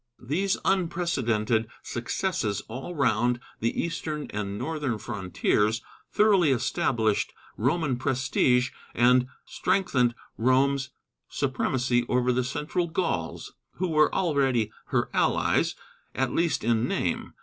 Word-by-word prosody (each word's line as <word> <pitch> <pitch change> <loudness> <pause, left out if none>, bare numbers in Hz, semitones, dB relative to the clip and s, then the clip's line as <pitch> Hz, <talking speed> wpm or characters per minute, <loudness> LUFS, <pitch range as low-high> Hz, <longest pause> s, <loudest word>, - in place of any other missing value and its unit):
These 185 +10 0
unprecedented 130 - +1 0.2
successes 120 - -2
all 130 +10 -6
round 120 -3 +2 0.2
the 115 - -1
eastern 155 -3 -3
and 100 -1 -3
northern 150 -6 -2
frontiers 105 +2 0 0.3
thoroughly 200 -7 +4
established 120 -3 +1 0.2
Roman 135 +2 0
prestige 130 0 +2 0.2
and 125 +1 +4 0.2
strengthened 125 -11 +1 0.2
Rome's 135 +3 +2 0.4
supremacy 130 -2 0
over 125 0 +2
the 130 +1 +1
central 150 +7 -2
Gauls, 160 - -2 0.2
who 185 +1 -2
were 155 -1 +4
already 135 - +1
her - - -1
allies, - - +2 0.4
at 130 -2 0
least 165 -5 +1
in 115 +1 +2
name. - - -2
130 Hz, 105 wpm, -27 LUFS, 120-155 Hz, 0.4 s, thoroughly